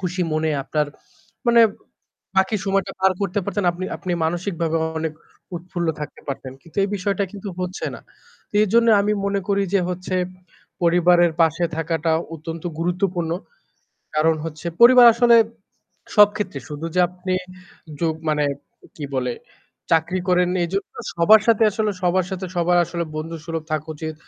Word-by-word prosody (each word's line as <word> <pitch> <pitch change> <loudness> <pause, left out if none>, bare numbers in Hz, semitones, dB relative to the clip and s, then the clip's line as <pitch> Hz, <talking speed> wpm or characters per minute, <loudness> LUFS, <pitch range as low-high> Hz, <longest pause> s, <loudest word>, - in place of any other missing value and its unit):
খুশি 180 0 -2
মনে 155 0 0
আপনার 150 -1 0 0.6
মানে 235 0 +6 0.8
বাকি 190 +3 +3
সময়টা 195 -1 0
পার 190 0 +4
করতে 200 0 -1
পারতেন। 200 0 -2
আপনি 180 +2 -6
আপনি 180 - -4
মানসিকভাবেও 165 -1 -1 0.2
অনেক 160 -1 -2 0.4
উৎফুল্ল 175 0 -4
থাকতে 150 - -7
পারতেন, 135 -1 -5
কিন্তু 165 - -19
এই - - -2
বিষয়টা 200 +1 -1
কিন্তু 200 0 -7
হচ্ছে 180 0 -3
না। - - -10 0.5
তো - - -23
এজন্য 230 +3 +3
আমি 210 +1 +1
মনে 200 0 0
করি 200 0 +2
যে 195 - +4
হচ্ছে 185 +1 -3 0.7
পরিবারের 175 0 +4
পাশে 165 +2 +2
থাকাটা 165 0 -1 0.2
অত্যন্ত 165 +1 -7
গুরুত্বপূর্ণ। 175 -1 -1 0.8
কারণ 160 +1 +3
হচ্ছে 160 0 -7
পরিবার 245 0 +9
আসলে 235 0 +5 0.8
সব 210 -1 +9
ক্ষেত্রে 185 -9 -4
শুধু 150 +2 -5
যে - - +3
আপনি 185 +1 -4 0.7
যুগ 165 -2 +1
মানে 150 -1 +1 0.5
কি 150 - -6
বলে? 125 -1 -1 0.6
চাকরি 170 +3 +2
করেন 180 0 +3 0.2
এইজন্য 195 +3 -2 0.3
সবার 210 +6 +7
সাথে 225 -1 +5
আসলে 215 +1 -1
সবার 180 0 +2
সাথে 190 0 -4
সবার 175 +1 +3
আসলে 170 0 -3
বন্ধুসুলভ 165 0 -5
থাকা 155 0 -2
উচিত 155 +1 -5
175 Hz, 150 wpm, -22 LUFS, 165-195 Hz, 0.8 s, পরিবার